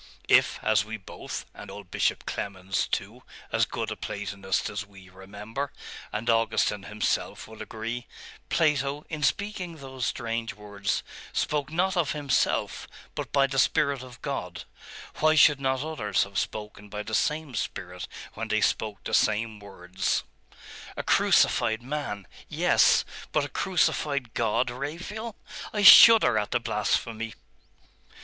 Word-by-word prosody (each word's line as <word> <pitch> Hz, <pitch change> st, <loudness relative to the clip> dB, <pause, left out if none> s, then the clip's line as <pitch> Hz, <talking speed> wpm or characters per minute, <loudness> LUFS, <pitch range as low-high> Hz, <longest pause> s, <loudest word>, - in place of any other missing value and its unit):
If, -, -, +4 dB
as 110 Hz, -1 st, +3 dB
we 110 Hz, +1 st, -6 dB
both 95 Hz, -, -7 dB
and -, -, -10 dB
old 100 Hz, -2 st, -10 dB
Bishop -, -, 0 dB
Clemens, 95 Hz, -1 st, -2 dB
too -, -, -3 dB, 0.3 s
as -, -, +2 dB
good -, -, -4 dB
a -, -, -3 dB
Platonist 100 Hz, -2 st, -3 dB
as 105 Hz, -1 st, -4 dB
we, 95 Hz, -2 st, -16 dB
remember 105 Hz, +8 st, -6 dB, 0.4 s
and 110 Hz, +3 st, -4 dB
Augustine 115 Hz, -3 st, +2 dB
himself, 105 Hz, +1 st, -2 dB
would 110 Hz, 0 st, -11 dB
agree, 115 Hz, +2 st, -5 dB, 0.4 s
Plato 145 Hz, -2 st, +1 dB
in 155 Hz, -1 st, -5 dB
speaking 185 Hz, -1 st, -1 dB
those 130 Hz, -4 st, -5 dB
strange 115 Hz, -2 st, -3 dB
words, 100 Hz, -1 st, -3 dB, 0.3 s
spoke 150 Hz, -1 st, -1 dB
not 185 Hz, +3 st, +1 dB
of 170 Hz, -5 st, +1 dB
himself, 145 Hz, -3 st, 0 dB, 0.3 s
but -, -, -5 dB
by 140 Hz, -1 st, +4 dB
the 135 Hz, 0 st, -1 dB
Spirit 140 Hz, -1 st, +2 dB
of 130 Hz, -1 st, -11 dB
God, 90 Hz, -11 st, -4 dB, 0.5 s
why 155 Hz, 0 st, +4 dB
should 145 Hz, -2 st, +6 dB
not 130 Hz, 0 st, 0 dB
others 135 Hz, -10 st, 0 dB
have 100 Hz, -1 st, -3 dB
spoken 105 Hz, -1 st, -5 dB
by 105 Hz, +1 st, -5 dB
the 110 Hz, -, -8 dB
same 150 Hz, +4 st, 0 dB
Spirit 90 Hz, -3 st, -4 dB, 0.3 s
when 115 Hz, +1 st, -4 dB
they 110 Hz, 0 st, +1 dB
spoke 105 Hz, -1 st, -1 dB
the -, -, -5 dB
same 110 Hz, 0 st, +2 dB
words?' 95 Hz, -2 st, -2 dB, 0.7 s
'A -, -, -2 dB
crucified 110 Hz, +1 st, +3 dB
man.... 130 Hz, -8 st, -4 dB, 0.2 s
Yes. -, -, +4 dB, 0.3 s
But -, -, +1 dB
a -, -, -7 dB
crucified 145 Hz, -8 st, 0 dB
God, 115 Hz, +2 st, +1 dB
Raphael! 175 Hz, -, -5 dB, 0.4 s
I 210 Hz, -1 st, -1 dB
shudder 210 Hz, -, +10 dB
at 105 Hz, -, -3 dB
the 120 Hz, -, +1 dB
blasphemy. 115 Hz, 0 st, -1 dB
115 Hz, 140 wpm, -27 LUFS, 105-145 Hz, 0.7 s, shudder